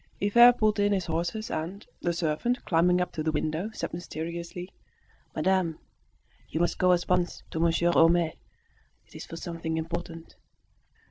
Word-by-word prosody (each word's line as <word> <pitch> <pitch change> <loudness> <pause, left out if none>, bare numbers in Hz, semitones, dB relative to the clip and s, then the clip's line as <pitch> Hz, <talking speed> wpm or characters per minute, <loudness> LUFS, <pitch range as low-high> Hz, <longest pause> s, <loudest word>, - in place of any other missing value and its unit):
Hivert 235 +4 +6
pulled 215 -1 +2
in 205 0 +3
his 190 -3 -1
horses 170 +7 -3
and, 170 +6 -4 0.2
the 175 - 0
servant, 170 +9 -1
climbing 180 +1 +3
up 180 - -1
to 155 - -4
the 160 0 0
window, 155 +6 -2
said - - -5
mysteriously 170 +1 -6 0.7
"Madame, 185 -4 +1 0.7
you 160 - -3
must 175 - 0
go 185 -1 +4
at 175 -1 +1
once 180 -1 0
to 160 - -3
Monsieur 170 +1 +2
Homais. 165 -1 +4 0.7
It's - - -11
for 165 - -8
something 165 -1 -4
important." 165 0 -5
170 Hz, 150 wpm, -27 LUFS, 165-185 Hz, 0.7 s, Hivert